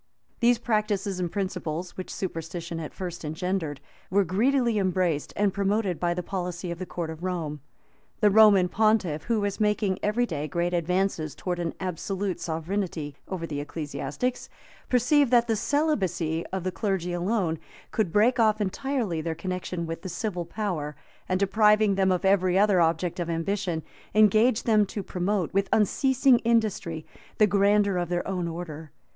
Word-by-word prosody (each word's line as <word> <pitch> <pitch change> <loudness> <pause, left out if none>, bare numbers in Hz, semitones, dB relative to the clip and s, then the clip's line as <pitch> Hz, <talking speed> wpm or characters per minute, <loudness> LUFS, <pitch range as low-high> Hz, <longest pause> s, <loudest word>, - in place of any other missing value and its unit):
These 240 0 +4
practices 210 -4 -1
and 175 -2 -2
principles, 180 -3 -3
which 185 - -6
superstition 165 -1 -5
at 155 - -6
first 175 -2 -6
engendered, 160 -1 -2 0.3
were 200 +2 +3
greedily 235 +5 +2
embraced 180 -5 0
and 205 -2 +1
promoted 200 -2 0
by 175 -1 0
the 180 - -3
policy 180 -1 -4
of 170 - -6
the 185 - -5
court 170 -2 -4
of 160 0 -9
Rome. 165 -6 -3 0.6
The 210 -1 +4
Roman 205 -3 +7
pontiff, 205 -7 +1
who 230 -2 +1
was 205 +1 -2
making 210 -2 +1
every 225 +4 +1
day 150 -9 -3
great 175 +4 -1
advances 175 -3 0
towards 175 +1 -3
an 165 -2 -3
absolute 190 +1 -3
sovereignty 160 -3 -3
over 180 -3 -4
the 150 -3 -4
ecclesiastics, 150 - -4 0.4
perceived 260 +3 +4
that 240 -1 +5
the 225 - +2
celibacy 195 - 0
of 190 -1 -4
the 185 - -1
clergy 190 -4 -2
alone 175 -2 0 0.3
could 210 -7 0
break 225 +6 +3
off 215 -1 +4
entirely 215 - -1
their 160 0 -3
connection 180 0 -4
with 165 0 -5
the 190 - -6
civil 175 -1 -3
power, 170 -6 -3 0.3
and, 185 0 +1
depriving 210 +1 +4
them 190 -1 +2
of 180 +1 0
every 185 -1 +3
other 200 -3 +4
object 165 +2 0
of 170 -1 -2
ambition, 170 0 -1 0.3
engage 215 +3 +5
them 215 -2 +4
to 205 - -5
promote, 185 -1 -1
with 195 0 +1
unceasing 265 +4 +3
industry, 215 -9 0 0.3
the 215 - +6
grandeur 200 -1 +3
of 175 -1 -1
their 175 0 -1
own 180 -3 -2
order. 160 -2 -7
185 Hz, 165 wpm, -26 LUFS, 170-210 Hz, 0.6 s, Roman